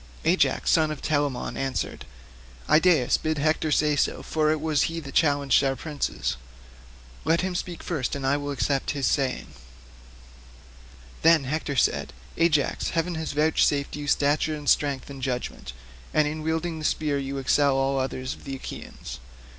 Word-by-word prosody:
Ajax - - +2
son 160 -1 +4
of 155 -2 -4
Telamon 145 -4 -1
answered, 135 -2 -3 0.6
"Idaeus, 155 -5 +4
bid 155 0 -1
Hector 155 +1 +1
say 150 0 +3
so, 145 - 0
for 155 -1 +1
it 155 - 0
was 155 -2 +1
he 165 0 -4
that 140 -4 -9
challenged 145 -4 +3
our 135 -1 +1
princes. 145 - -3 0.9
Let 165 +1 +2
him 185 0 -2
speak 175 -1 -4
first 150 -8 -2
and 140 -1 -4
I 135 +2 +3
will 145 0 -3
accept 140 0 -1
his 135 - 0
saying." 135 -3 0 1.7
Then 165 -2 +5
Hector 145 +1 -2
said, - - +1 0.2
"Ajax, 155 -4 +1
heaven 170 +1 -1
has 160 -2 -4
vouchsafed 145 -1 +2
you 145 -1 -6
stature 145 +2 +2
and 145 -1 -8
strength, 140 -1 +1
and 135 -1 -9
judgement; 125 - -4 0.4
and 155 -1 +4
in 155 +1 -4
wielding 160 +1 -2
the 155 - -5
spear 150 -3 0
you 140 0 -4
excel 140 +1 +3
all 135 0 +1
others 130 0 -3
of - - -15
the 135 - -5
Achaeans. 130 - -8
145 Hz, 160 wpm, -26 LUFS, 135-155 Hz, 1.7 s, Then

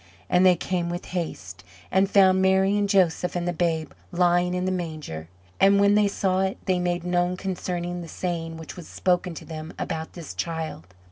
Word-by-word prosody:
And 180 +1 +5
they 185 -1 +7
came 175 0 -2
with 175 0 -4
haste, 95 - -4 0.3
and 190 +1 +3
found 190 -2 +5
Mary 190 +1 +3
and 205 -1 +1
Joseph 180 -3 +2
and 175 0 -1
the 175 - 0
babe 165 -2 -1 0.2
lying 175 0 +2
in 180 0 -1
the 185 - 0
manger. 155 - -5 0.3
And 200 +1 +6
when 200 0 +5
they 210 0 +4
saw 190 -1 0
it, 190 0 -1
they 185 -1 +1
made 175 -1 -1
known 180 0 +1
concerning 175 -2 -3
the 170 - -8
saying 165 -1 -4
which 160 -1 -9
was 175 -4 -10
spoken 180 -1 0
to - - -9
them 160 0 -7
about 160 0 -4
this 170 -3 -8
child. 160 - -4
175 Hz, 195 wpm, -25 LUFS, 165-190 Hz, 0.3 s, they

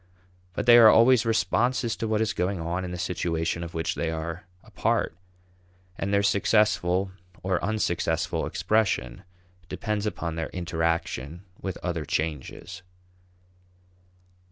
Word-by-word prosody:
But - - -3
they 120 0 +8
are 110 -2 +9
always 115 0 +5
responses 115 +1 +1
to 115 - -2
what 110 0 +1
is 110 - 0
going 90 +1 -1
on 85 +3 -2
in 90 - -4
the 90 - -5
situation 85 -2 -2
of 85 0 -8
which 80 -1 -1
they 85 - -2
are 80 +2 -5 0.2
a - - -18
part, - - 0 0.8
and 95 +2 -3
their 100 0 +3
successful 100 -2 +2 0.3
or 95 0 0
unsuccessful 85 -6 -1
expression 110 -3 0 0.5
depends 105 -1 -2
upon 85 -5 -3
their 80 - -3
interaction 85 -2 -2 0.2
with 95 -2 -4
other 85 -3 -2
changes. 75 +2 -4
90 Hz, 130 wpm, -26 LUFS, 85-105 Hz, 0.8 s, are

